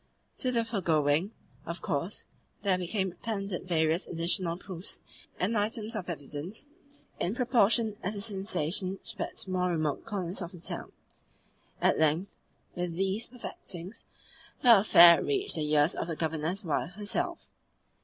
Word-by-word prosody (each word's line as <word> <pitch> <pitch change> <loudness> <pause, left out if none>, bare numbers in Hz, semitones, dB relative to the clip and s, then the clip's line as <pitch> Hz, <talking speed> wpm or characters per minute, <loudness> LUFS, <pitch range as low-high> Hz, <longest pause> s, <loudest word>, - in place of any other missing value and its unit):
To 255 - -1
the 230 -2 +1
foregoing, 165 -5 +1 0.4
of - - -5
course, - - -2 0.4
there 190 -3 +2
became 190 +1 -1
appended 195 -1 -4
various 160 0 +1
additional 170 +1 0
proofs 185 -1 -7 0.4
and 205 +6 +1
items 220 +1 -1
of 185 -4 -4
evidence, 155 - -5 0.5
in 190 +6 0
proportion 230 -3 +3
as 200 +4 -2
the 200 - -3
sensation 190 -3 0
spread 225 -2 -4
to 190 - -5
more 180 0 +1
remote 155 -4 -1
corners 195 -4 -2
of 175 0 -5
the 175 - -10
town. - - -4 0.9
At - - +3
length, 160 +5 +2 0.4
with 175 -1 -3
these 195 +5 0
perfectings, 195 -5 -8 0.6
the 235 -5 +9
affair 170 -4 +8
reached 400 -1 0
the 150 -1 -1
ears 150 +2 +4
of - - -3
the 165 - -3
Governor's 160 +5 -2
wife 165 +3 -1
herself. 205 +2 -3
185 Hz, 145 wpm, -30 LUFS, 165-210 Hz, 0.9 s, the